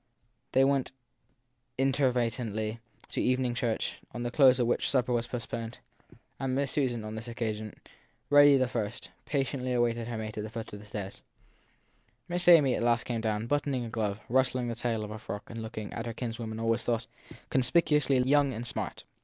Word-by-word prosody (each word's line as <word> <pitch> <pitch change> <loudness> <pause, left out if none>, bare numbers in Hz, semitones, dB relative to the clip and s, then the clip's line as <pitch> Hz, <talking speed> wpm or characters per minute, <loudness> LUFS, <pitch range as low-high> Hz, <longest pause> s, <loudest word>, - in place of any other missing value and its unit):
They 130 - +5
went 135 -1 +1 0.8
inveter 135 0 +3
ately 115 -2 -2 0.3
to - - -1
evening 125 -1 +1
church, 120 -2 -2
to 120 - -6
the 120 0 -2
close 130 -2 +6
of 125 - +2
which 120 - +1
supper 125 -2 +1
was 120 0 0
post 120 -1 -6
poned; 115 +1 -4 0.6
and 130 -1 -1
Miss 140 0 0
Susan, 120 -6 0
on 110 - -5
this 110 +1 -6
occasion, 110 -2 -4 0.6
ready 145 -1 +8
the 130 -1 +2
first, 115 -2 -4
patiently 135 -3 -1
awaited 120 -1 +1
her 120 -2 -4
mate 110 -1 -5
at - - -3
the 110 - -5
foot 115 -1 -7
of 105 - -7
the 105 - -13
stairs. 100 -2 -6 1.1
Miss 175 0 -1
Amy 150 -7 +7
at - - -1
last 120 0 +2
came 115 -2 -2
down, 110 0 -1
buttoning 140 -1 0
a - - -6
glove, 105 -3 -2
rustling 130 -1 +1
the 115 - -3
tail 115 -2 -1
of 105 - -6
a 110 - -6
frock, 105 -2 -6
and 115 0 -6
looking, 110 -1 -6
as 115 - -4
her 115 - -3
kinswoman 115 -2 -5
always 115 0 +1
thought, 115 -1 0 0.5
conspicuously 140 +1 +3
young 140 0 +3
and 115 +1 -5
smart. - - -3
120 Hz, 190 wpm, -30 LUFS, 110-130 Hz, 1.1 s, ready